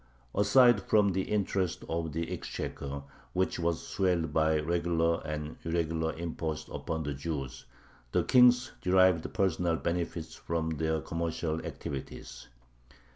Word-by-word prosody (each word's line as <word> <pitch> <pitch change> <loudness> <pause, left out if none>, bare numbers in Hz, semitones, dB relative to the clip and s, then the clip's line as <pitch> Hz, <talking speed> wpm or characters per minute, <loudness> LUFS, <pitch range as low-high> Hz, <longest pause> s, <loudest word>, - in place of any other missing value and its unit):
Aside 120 +1 +5
from 105 -1 +3
the 95 +1 0
interests 95 -3 0
of 80 -1 -2
the 80 +2 -3
exchequer, 70 0 -5 0.3
which 95 0 0
was 85 -1 -1
swelled 90 -4 0
by 80 0 +3
regular 85 +1 +1
and 75 0 -5
irregular 80 -1 0
imposts 80 -2 -4
upon 80 -1 -3
the 70 -1 -2
Jews, 70 -3 -5 0.5
the - - +2
kings 125 0 +5
derived 95 -2 +4
personal 90 -5 +1
benefits 85 -1 -3
from 80 -1 -2
their 80 0 0
commercial 80 -1 -2
activities. 70 -2 -7
85 Hz, 125 wpm, -30 LUFS, 80-90 Hz, 0.5 s, Aside